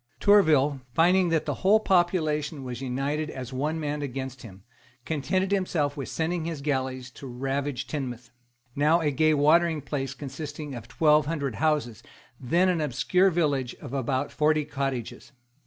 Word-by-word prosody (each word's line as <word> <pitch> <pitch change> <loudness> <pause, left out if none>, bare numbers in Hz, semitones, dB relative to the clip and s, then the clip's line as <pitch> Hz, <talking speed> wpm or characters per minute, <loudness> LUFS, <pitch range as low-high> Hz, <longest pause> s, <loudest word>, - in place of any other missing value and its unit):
Tourville, 150 -9 +4
finding 180 +2 +4
that 165 -2 +1
the - - -1
whole 205 +3 +5
population 160 -7 +1
was 125 -1 -6
united 140 +4 -2
as 130 -2 -7
one 150 +5 -1
man 150 -1 -3
against 130 -2 -5
him, 95 -4 -12 0.4
contented 185 +6 -1
himself 170 -7 0
with 140 -4 -5
sending 165 0 -2
his 165 -4 -4
galleys 130 -3 -2
to 135 - -10
ravage 135 +2 -3
Teignmouth, 125 -5 -5 0.4
now 150 +4 +3
a 150 -2 +1
gay 155 +3 +3
watering 160 +2 +3
place 135 -2 -4
consisting 145 +1 -7
of 120 -2 -8
twelve 150 +1 +3
hundred 140 -5 -2
houses, 150 -7 0 0.4
then 170 +9 +2
an 175 -3 +1
obscure 150 +7 +2
village 145 -8 0
of 125 - -10
about 130 -1 -1
forty 155 0 +2
cottages. 135 -3 -4
145 Hz, 155 wpm, -26 LUFS, 130-160 Hz, 0.4 s, whole